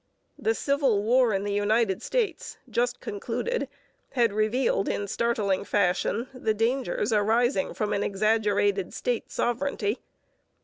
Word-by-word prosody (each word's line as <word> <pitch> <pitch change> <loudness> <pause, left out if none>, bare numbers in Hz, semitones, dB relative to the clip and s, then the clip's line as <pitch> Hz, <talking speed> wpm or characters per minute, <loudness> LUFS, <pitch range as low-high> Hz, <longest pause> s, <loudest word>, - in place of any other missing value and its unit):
The 450 +1 +1
Civil 275 -8 +1
War 245 +1 +4
in 195 -1 0
the 205 0 -2
United 205 -1 +1
States, 440 -9 -2
just 245 +2 0
concluded, 245 - -3 0.4
had 235 -5 +2
revealed 215 0 +1
in 200 - -2
startling 205 -3 0
fashion 200 +4 0
the 225 -4 -1
dangers 235 0 0
arising 235 +6 +2
from 210 -2 -1
an 200 - 0
exaggerated 205 -2 +1
state 245 -2 -2
sovereignty. 240 -3 -1
225 Hz, 125 wpm, -27 LUFS, 205-245 Hz, 0.4 s, War